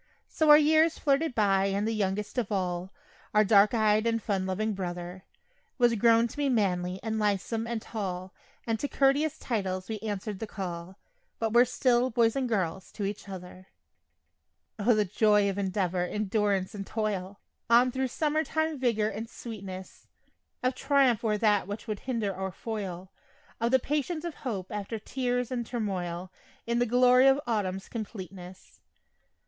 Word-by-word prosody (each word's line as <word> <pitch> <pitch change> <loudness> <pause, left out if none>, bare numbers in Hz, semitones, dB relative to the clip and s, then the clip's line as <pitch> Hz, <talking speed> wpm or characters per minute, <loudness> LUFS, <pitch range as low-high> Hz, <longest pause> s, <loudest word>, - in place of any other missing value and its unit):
So 315 -1 +1
our 295 - +11
years 315 +2 +4
flitted 285 0 +1
by 195 -3 +3
and 200 +2 0
the 225 - 0
youngest 210 +3 -1
of 225 -3 -3
all 180 -1 -2 0.4
Our 215 - +6
dark 205 +2 +5
eyed 215 0 +3
and 230 0 +1
fun 195 -3 -1
loving 215 +3 -1
brother 180 0 -6 0.5
Was 240 -2 +4
grown 230 +1 +4
to - - -12
be 290 -1 +1
manly 185 -6 0
and 220 -1 -2
lithesome 210 +2 0
and 235 -1 -2
tall, 185 -4 -5 0.3
And 225 -1 -1
to 285 - -1
couteous 285 +3 +2
titles 190 -5 -3
we 220 -1 -3
answered 205 -1 -4
the 220 - -4
call, 180 -2 -6 0.4
But 225 -1 -1
were 240 +1 +7
still 250 0 +2
"boys" 230 -2 +2
and 260 -2 -1
"girls" 190 -4 -2
to 205 - -3
each 200 0 -5
other. 185 0 -9 1.1
O, 225 +3 +4
the 210 -1 +2
joy 210 +1 +3
of 200 0 -2
endeavor, 185 -2 0
endurance 200 0 0
and 195 -2 -6
toil 205 -3 -3 0.3
On 245 +2 +5
thro' 265 +1 -1
summer 305 +4 0
time 315 -2 -1
vigor 230 -4 +1
and 225 +1 -6
sweetness, 195 -6 -9 0.6
Of 255 +1 +2
triumph 270 -4 +2
o'er 215 -2 +1
that 205 -3 +2
which 205 +2 -6
would 210 -2 -3
hinder 225 -7 -2
or 190 0 -3
foil, 190 -3 -6 0.5
Of 230 +1 +1
the 260 - +5
patience 300 +5 -2
of 340 - -3
hope 210 -11 -5
after 210 +1 -4
tears 245 +2 -2
and 245 -2 -1
turmoil, 185 -6 -4 0.3
In 235 +1 0
the 245 - +2
glory 250 +2 +5
of 270 +1 +5
autumn's 195 -5 -2
completeness. 190 -5 -8
215 Hz, 165 wpm, -28 LUFS, 190-245 Hz, 1.1 s, our